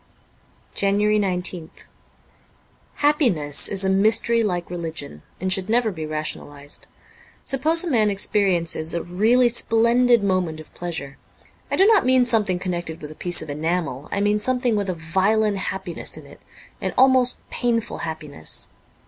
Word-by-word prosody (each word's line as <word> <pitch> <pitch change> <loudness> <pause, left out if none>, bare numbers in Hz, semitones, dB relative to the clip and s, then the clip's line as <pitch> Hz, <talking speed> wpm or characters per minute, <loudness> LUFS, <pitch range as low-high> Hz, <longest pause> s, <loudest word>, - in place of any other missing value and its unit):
'' - - -35
19 - - -3 0.2
JANUARY 210 0 +2
19th 180 -4 -2 1.1
HAPPINESS 235 - +1
is 195 -1 +1
a - - +2
mystery 220 +4 +3
like 180 -5 -2
religion, 160 - -6 0.2
and 185 +1 +1
should 190 +1 -2
never 230 -1 +2
be 160 -4 -6
rationalized. 145 -2 -6 0.6
Suppose 315 +6 +1
a - - -4
man 220 -4 +3
experiences 180 -5 +1
a 170 - -2
really 225 +8 +3
splendid 235 0 +3
moment 185 -5 -1
of 155 - -14
pleasure. 160 -6 -6 0.5
I - - 0
do 385 - +5
not 430 -2 +5
mean 255 0 +4
something 215 -6 +2
connected 175 -3 -4
with 150 0 -9
a - - -8
piece 175 +1 -1
of 155 - -11
enamel, 150 -2 -3
I 200 - -1
mean 205 +1 +2
something 250 0 +1
with 200 -2 -1
a 185 - -2
violent 195 +6 +1
happiness 190 -2 -3
in - - -11
it - - -16 0.2
— - - -26
an - - -3
almost 255 -1 +3
painful 235 -2 -1
happiness. 155 - -2
190 Hz, 155 wpm, -22 LUFS, 165-230 Hz, 1.1 s, do